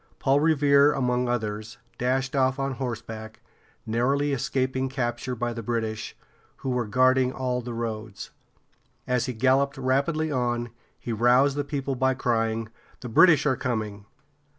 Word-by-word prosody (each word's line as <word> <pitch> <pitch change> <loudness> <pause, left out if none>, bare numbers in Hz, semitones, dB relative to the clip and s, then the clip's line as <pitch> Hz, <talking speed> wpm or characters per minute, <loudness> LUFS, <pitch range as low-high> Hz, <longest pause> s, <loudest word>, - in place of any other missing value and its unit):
Paul 135 +1 +2
Re 160 +1 +3
vere´, 140 0 +4
among 125 -1 0
others, 110 -1 -3 0.2
dashed 130 +2 0
off 130 -1 +2
on 135 0 -1
horseback, 115 -3 -6 0.5
narrowly 135 +6 +1
escaping 130 0 -1
capture 125 -1 -3
by 120 0 -2
the 115 - -5
British, 110 -1 -3 0.4
who 130 - -4
were 125 -3 -1
guarding 130 +3 +3
all 125 -1 -2
the 120 -1 -6
roads. 110 -3 -5 0.7
As 125 -1 0
he 125 - -3
galloped 135 +4 +2
rapidly 140 +4 0
on, 120 -3 -1 0.3
he 120 - -5
roused 125 +5 +4
the 145 - -1
people 140 -1 -3
by 130 0 +1
crying: 115 -2 -1 0.3
"The 125 - -6
British 155 +3 +6
are 135 -3 +3
coming!" 110 -6 -4
125 Hz, 150 wpm, -26 LUFS, 115-135 Hz, 0.7 s, British